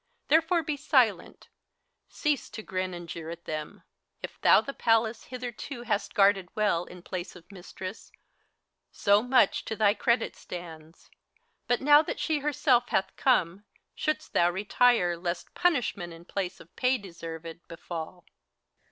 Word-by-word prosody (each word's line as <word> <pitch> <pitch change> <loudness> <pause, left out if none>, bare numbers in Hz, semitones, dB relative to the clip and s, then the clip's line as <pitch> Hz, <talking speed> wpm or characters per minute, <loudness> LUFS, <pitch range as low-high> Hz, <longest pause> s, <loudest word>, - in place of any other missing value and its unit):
Therefore 325 +3 +3
be 295 -1 -2
silent, 295 - +1 0.6
cease 300 -3 -1
to 220 - -8
grin 185 -2 -3
and 175 -1 -8
jeer 165 -1 -7
at 170 0 -8
them! 155 -1 -6 0.4
If - - -8
thou - - +7
the 275 - -5
Palace 225 -1 +1
hitherto 250 0 -7
hast 215 -3 -2
guarded 195 -2 +4
well 205 -5 +1
In 180 -1 -12
place 185 -1 -6
of 180 +2 -15
Mistress, 190 +1 -9 0.8
so 205 0 +3
much 250 +1 +3
to 220 - -3
thy 210 -2 +4
credit 235 0 0
stands; 165 -2 -10 0.6
But 245 - +1
now 290 +2 +7
that 315 - -5
she 310 -2 0
herself 265 -4 +2
hath 190 0 0
come, 200 -6 +1 0.3
shouldst 305 0 -2
thou 175 - +4
retire 195 0 +2
Lest 175 0 -4
punishment, 245 - 0
in 165 +1 -13
place 190 -1 -4
of 165 - -17
pay 255 +1 +2
deserved, 165 -4 -9
befall 170 +1 -7
200 Hz, 145 wpm, -28 LUFS, 175-245 Hz, 0.8 s, thou